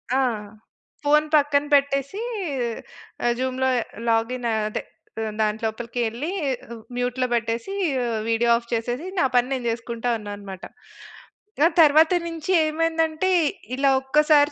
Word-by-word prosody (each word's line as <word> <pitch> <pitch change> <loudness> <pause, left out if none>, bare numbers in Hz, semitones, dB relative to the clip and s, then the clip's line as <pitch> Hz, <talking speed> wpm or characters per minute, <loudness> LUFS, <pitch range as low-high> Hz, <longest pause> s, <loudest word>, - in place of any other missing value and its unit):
ఆ! - - +3 0.8
ఫోన్ 300 +1 +4
పక్కన 285 -1 +3
పెట్టేసి 280 - +2 1.0
ఆహ్, 240 - +3
జూమ్‌లో 260 0 0 0.4
లాగిన్ 235 +2 0
అదే 215 -1 -1 0.4
ఆహ్, 220 -1 -3
దాంట్లోపలికేళ్ళి 230 +5 -2 0.7
మ్యూట్‌లో 250 +1 0
పెట్టేసి 230 +9 -2 0.3
ఆహ్, 230 -2 -1
వీడియో 230 +1 +2
ఆఫ్ 235 0 -10
చేసేసి 240 +8 -2
నా - - +4
పని 245 +1 +3
నేను 255 -2 -3
జేసుకుంటా 235 +1 -3
ఉన్నానన్నమాట. 205 -2 -8 1.0
ఆ - - +8
తరువాత 315 +2 +6
నుంచి 330 +1 -4
ఏమైందంటే 325 +2 0 0.5
ఇలా 275 +1 +3
ఒక్కసారి 295 +2 +4
255 Hz, 110 wpm, -23 LUFS, 230-300 Hz, 1.0 s, ఆ